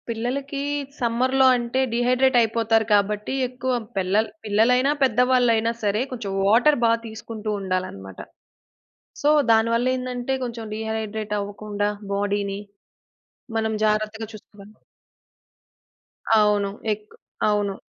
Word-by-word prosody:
పిల్లలకీ 265 +5 -3 0.4
సమ్మర్‌లో 255 +2 +2
అంటే, 240 +2 -2
డీహైడ్రేట్ 250 +2 +2
అయిపోతారు 225 0 +2
కాబట్టి, 210 +3 +1
ఎక్కువ 255 +1 -3 0.2
పెల్లల్ 200 +4 +1 0.2
పిల్లలైనా 250 +6 +3
పెద్దవాళ్ళైనా 245 -2 +3
సరే, 210 +2 +1
కొంచెం 230 -6 -5 0.2
వాటర్ 245 +8 +5
బా 230 - +4 0.2
తీసుకుంటువుండాలనమాట. 195 - -5 1.0
సో, 290 - +3 0.2
దానివల్ల 230 +2 +3
ఏందంటే, 255 0 -3
కొంచెం 230 -2 -6
డీహైడ్రేట్ 220 -1 -4
అవ్వకుండా 205 0 -3 0.2
బాడీ‌ని, 200 0 -1 1.0
మనం 220 0 0
జాగ్రత్తగా 215 +1 -1
చూసుకోగలం. 210 0 -14 1.6
అవును. 205 -1 +2 0.2
ఏక్ 210 0 -4 0.4
అవును. 205 -1 0
220 Hz, 95 wpm, -23 LUFS, 205-245 Hz, 1.6 s, వాటర్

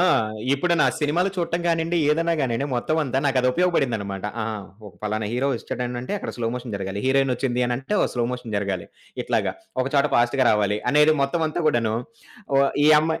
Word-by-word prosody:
ఆ! - - +4 0.5
ఇప్పుడు 170 +5 +1
నా - - +5
సినిమాలు 170 +6 +1
చూడటం 170 0 -1
గానియండి, 165 +1 +1
ఏదైనా 165 +2 +2
గానియండి 130 +1 0
మొత్తం 155 +6 0
అంతా 135 0 -1
నాకది 130 -2 +2
ఉపయోగపడిందన్నమాట. 115 - 0 0.2
ఆ! - - -1 0.4
ఒక 95 - -12
పలానా 105 0 -2
హీరో 130 +3 0
ఒచ్చాడనంటే, 125 - -4
అక్కడ - - -5
స్లో 115 -1 -2
మోషన్ 120 -4 -5
జరగాలి. 95 +1 -4
హీరోయినొచ్చింది 130 -2 +1
అని 120 - 0
అంటే, 135 +10 -6
ఒక - - +1
స్లో 120 -1 0
మోషన్ 125 -4 -5
జరగాలి. 100 -3 -2 0.4
ఇట్లాగా. - - 0 0.3
ఒక 130 - -4
చోట 140 - +4
ఫాస్ట్‌గా 120 +2 +3
రావాలి 105 -1 +1
అనేది 150 +2 +5
మొత్తం 160 +4 0
అంతా 175 - -3
కూడాను 115 -5 +1 0.6
ఓ - - +5 0.3
ఈ - - +6
అమ్మాయి 160 +1 -1
130 Hz, 180 wpm, -23 LUFS, 115-155 Hz, 0.6 s, ఈ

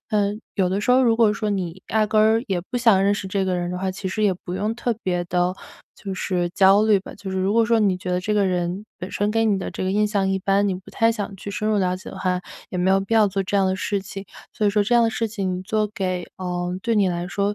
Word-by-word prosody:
嗯， 210 0 0
有 185 -3 +1
的 195 +2 -1
时 250 - +2
候 260 +1 +5
如 230 -3 +3
果 225 -3 +4
说 210 0 -2
你 185 -2 -3
压 215 -1 +2
根 220 +2 +3
也 185 -3 -1
不 245 - -1
想 225 -6 +4
认 200 +1 +3
识 200 -1 -3
这 195 0 -1
个 185 -1 0
人 175 0 -2
的 180 - -3
话， 190 0 -1
其 190 +1 -6
实 200 +3 -2
也 205 -2 +4
不 180 0 -7
用 210 +4 -1
特 240 -1 -1
别 180 -1 -1
地 180 +1 0 0.4
就 195 -2 -6
是 180 -2 -1
焦 195 +3 +5
虑 210 -3 +4
吧， - - -10
就 195 -2 -7
是 190 - -1
如 190 +2 +1
果 230 +1 +4
说 230 0 +2
你 195 -3 +2
觉 180 0 -4
得 180 - 0
这 210 +3 -2
个 205 -2 +2
人 180 +2 -2
本 180 - -7
身 205 - 0
给 225 0 +2
你 205 -3 +2
的 185 - -5
这 - - -4
个 185 - 0
印 210 +2 +2
象 200 -2 0
一 195 0 0
般， 200 +1 +2
你 - - 0
不 185 - -14
太 225 0 +3
想 210 -3 -4
去 200 - -7
深 215 +2 -2
入 215 - +2
了 185 -1 +1
解 185 - -11
的 - - -10
话， 185 -1 -1 0.3
也 180 - -3
没 185 +2 +3
有 195 - +3
必 195 +3 -5
要 220 -2 +5
做 195 0 -1
这 200 +1 -1
样 195 - +3
的 185 - +1
事 200 +1 -2
情， 195 0 -8 0.3
所 215 - -2
以 205 - +4
说 205 0 +2
这 240 - +1
样 240 - +6
的 225 - +2
事 225 +1 -1
情 190 -4 -3
做 215 +2 0
给 185 -5 -2
呃， 180 -1 -3
对 230 +3 0
你 200 -3 +3
来 175 0 -2
说 200 +2 -1
195 Hz, 320 characters per minute, -22 LUFS, 185-210 Hz, 0.4 s, 样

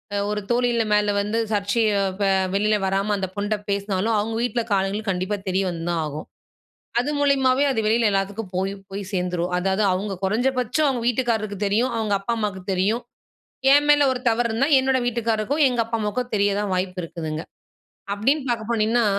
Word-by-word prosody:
அ - - +1
ஒரு 210 0 -2
தோழி 240 -1 +2
மேல 210 0 +3
வந்து 210 +3 -2
சர்ச்சைய 210 +2 +1 0.3
ப 205 - 0 0.3
வெளில 210 +2 +2
வராம 195 +2 0
அந்த 190 -1 -2
பொண்ணுட்ட 205 +1 -1
பேசினாலும், 200 +2 0
அவுங்க 225 +2 -2
வீட்ல 245 0 0
காலைல 195 +2 0
கண்டிப்பா 185 +2 -1
தெரிய 190 +1 +1
வந்துதான் 170 -1 -2
ஆகும். 150 +1 -6 0.7
அது 270 +5 -2
மூலியமாவே, 275 -1 +3
அது 225 - 0
வெளில 225 +1 +3
எல்லாத்துக்கும் 195 0 -2
போய் 190 +1 -1 0.2
போய் 200 +1 -4
சேர்ந்துரும். 180 -1 -1
அதாவது 190 +3 0
அவுங்க 195 +2 -2
குறைஞ்ச 225 +7 +1
பட்சம் 250 +5 +1
அவுங்க 245 -3 -1
வீட்டுக்காரருக்கு 225 -5 -1
தெரியும், 230 +5 +1
அவுங்க 215 -2 0
அப்பா, 230 +4 -1
அம்மாக்கு 200 -3 -3
தெரியும். 205 +6 +1 0.7
என் 290 +1 +4
மேல 290 0 +6
ஒரு 255 - -2
தவறு 235 +1 +1
இருந்தா, 260 +6 +1
என்னோட 265 0 +2
வீட்டுக்காரருக்கும், 235 +5 0
எங்க 245 -2 -2
அப்பா, 230 0 -2
அம்மாவுக்கும் 245 +4 -2
தெரிய 200 0 +2
தான் 210 - -2
வாய்ப்பு 185 0 -2
இருக்குதுங்க. 160 -2 -5 0.7
அப்டீன்னு 265 +8 +1
பார்க்க 230 -2 -2
போனீங்கன்னா, 230 +1 +2
215 Hz, 170 wpm, -23 LUFS, 195-240 Hz, 0.7 s, மேல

